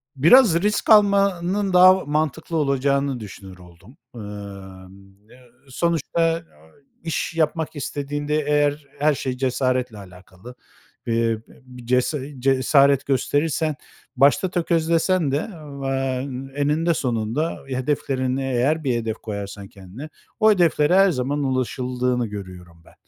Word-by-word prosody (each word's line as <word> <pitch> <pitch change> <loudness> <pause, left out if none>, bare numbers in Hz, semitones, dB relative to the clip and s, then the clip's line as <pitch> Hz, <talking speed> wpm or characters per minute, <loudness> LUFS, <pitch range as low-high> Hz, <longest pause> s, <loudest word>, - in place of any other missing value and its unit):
biraz 170 - +6
risk 210 +2 -1
almanın 200 -2 +3
daha 185 +1 +8
o 190 - -6
mantıklı 155 +2 -2
olacağını 140 -2 0
düşünür 95 -3 -11
oldum. 90 - -17 0.2
Emm, 100 -2 -11
e - - -16 0.3
sonuçta, 165 +2 0
ı 165 - -7 0.6
iş 165 0 -3
yapmak 160 0 -1
istediğinde 145 +2 -3
eğer 145 0 +1
her 150 +1 +3
şey 130 -2 -4
cesaretle 130 -2 -1
alakalı. 95 +4 -13 0.5
Eee, 115 - 0 0.3
bi - - -20
bi 125 -1 -13
cesa 125 +5 +1 0.2
cesaret 135 +1 +3
gösterirsen 150 +3 0 0.4
başta 140 +8 +3
tökezlesen 170 -1 +1
de, 140 - +1 0.5
eee, 135 0 -2 0.3
eninde 160 +4 +1
sonunda 120 +3 -2
hedeflerini, 130 0 -2
eğer 135 +4 0
bir 130 -4 0
hedef 115 -2 -2
koyarsan 100 -2 -7
kendine, 100 +11 -11 0.3
o 215 0 +5
hedeflere 170 -4 +3
her 195 0 +5
zaman 140 0 -2
ulaşıldığını 125 -2 -1
görüyorum 90 -4 -10
ben. - - -19
135 Hz, 120 wpm, -22 LUFS, 120-160 Hz, 0.6 s, daha